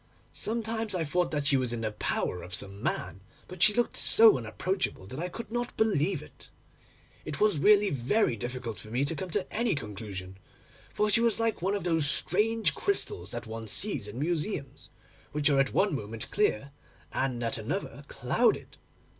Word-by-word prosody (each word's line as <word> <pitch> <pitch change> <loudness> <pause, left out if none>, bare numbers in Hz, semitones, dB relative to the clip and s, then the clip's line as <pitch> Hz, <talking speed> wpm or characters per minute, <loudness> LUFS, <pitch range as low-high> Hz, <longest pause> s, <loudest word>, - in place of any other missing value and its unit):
Sometimes 225 -2 -1
I 170 - 0
thought 175 +4 0
that 145 -2 -2
she 145 -1 +4
was 125 -2 -1
in 120 -1 -3
the 110 -1 -1
power 90 -3 -2
of 90 +2 -5
some 100 +1 -5
man, 95 - -2 0.3
but 185 -1 -10
she 215 - +8
looked 240 +3 0
so 225 0 +6
unapproachable, 130 - -2
that 130 +9 -7
I 180 +2 -2
could 220 +3 -8
not 240 0 -3
believe 200 -5 +1
it. - - -15 0.7
It - - -5
was 210 -7 +3
really 205 +4 +5
very 135 - +1
difficult 120 0 -5
for 110 - -10
me 125 +5 0
to 165 - 0
come 185 +3 -5
to 185 +2 0
any 225 -4 +1
conclusion, 100 -5 -7 0.5
for 210 0 +1
she 230 - +5
was 230 -1 +2
like 225 -4 0
one 195 +3 +1
of 200 - -3
those 165 -4 +3
strange 220 +9 +2
crystals 405 +1 -2
that 120 - -5
one 110 0 -7
sees 140 - -1
in 105 +3 -8
museums, 155 0 -3 0.4
which 150 0 +2
are 140 - +3
at 135 - +2
one 200 -3 +2
moment 110 -3 -5
clear, 140 - +1 0.4
and 125 -3 -1
at 115 - -1
another - - -4
clouded. - - 0
155 Hz, 185 wpm, -29 LUFS, -, 0.7 s, she